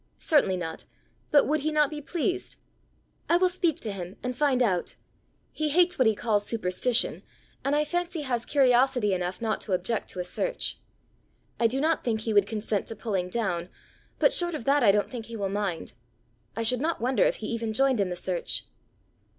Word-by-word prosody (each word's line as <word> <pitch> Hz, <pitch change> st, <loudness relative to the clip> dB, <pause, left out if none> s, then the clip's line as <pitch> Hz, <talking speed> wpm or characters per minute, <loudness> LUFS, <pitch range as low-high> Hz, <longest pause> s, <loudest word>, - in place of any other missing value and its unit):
"Certainly 275 Hz, -, +2 dB
not; 165 Hz, -2 st, -6 dB, 0.4 s
but 290 Hz, -, +5 dB
would 305 Hz, +2 st, +1 dB
he 310 Hz, +2 st, -1 dB
not 300 Hz, -1 st, +2 dB
be 300 Hz, -1 st, -5 dB
pleased?" 355 Hz, +5 st, -2 dB, 0.7 s
"I 340 Hz, -, +5 dB
will 365 Hz, +1 st, +3 dB
speak 350 Hz, -4 st, 0 dB
to 215 Hz, -, -3 dB
him, 185 Hz, -1 st, -7 dB
and 250 Hz, 0 st, -3 dB
find 260 Hz, -2 st, +2 dB
out. 185 Hz, -6 st, -1 dB, 0.6 s
He 310 Hz, -1 st, -1 dB
hates 355 Hz, +2 st, +3 dB
what 255 Hz, -, +5 dB
he 220 Hz, -, +3 dB
calls 210 Hz, -2 st, 0 dB
superstition, 225 Hz, +3 st, 0 dB, 0.4 s
and 280 Hz, +1 st, +1 dB
I 300 Hz, 0 st, +2 dB
fancy 350 Hz, 0 st, -2 dB
has 245 Hz, -4 st, -1 dB
curiosity 255 Hz, -5 st, +3 dB
enough 180 Hz, +3 st, -3 dB
not 220 Hz, -1 st, -1 dB
to 200 Hz, -, -3 dB
object 190 Hz, +5 st, -1 dB
to -, -, -6 dB
a -, -, -1 dB
search. -, -, -2 dB, 0.8 s
I 235 Hz, -, +4 dB
do 255 Hz, +4 st, -1 dB
not 320 Hz, +3 st, +1 dB
think 220 Hz, -3 st, -1 dB
he 220 Hz, 0 st, -2 dB
would 205 Hz, -1 st, +4 dB
consent 210 Hz, -1 st, -2 dB
to 225 Hz, -, -6 dB
pulling 190 Hz, -6 st, -2 dB
down, 180 Hz, -5 st, -2 dB, 0.5 s
but -, -, +4 dB
short 345 Hz, -2 st, +3 dB
of 240 Hz, -, -6 dB
that, 280 Hz, +1 st, +3 dB
I 205 Hz, -, +7 dB
don't 205 Hz, +1 st, +1 dB
think 235 Hz, -3 st, -6 dB
he 230 Hz, -1 st, -7 dB
will 200 Hz, -2 st, -2 dB
mind. 195 Hz, -8 st, -3 dB, 0.6 s
I 230 Hz, -, -2 dB
should 245 Hz, +2 st, +2 dB
not 330 Hz, +3 st, -1 dB
wonder 250 Hz, +3 st, 0 dB
if -, -, +4 dB
he 220 Hz, -, -7 dB
even 230 Hz, -1 st, -2 dB
joined 265 Hz, +1 st, +2 dB
in 195 Hz, -2 st, +1 dB
the 180 Hz, -, -3 dB
search." 175 Hz, 0 st, -2 dB
235 Hz, 200 wpm, -27 LUFS, 205-295 Hz, 0.8 s, I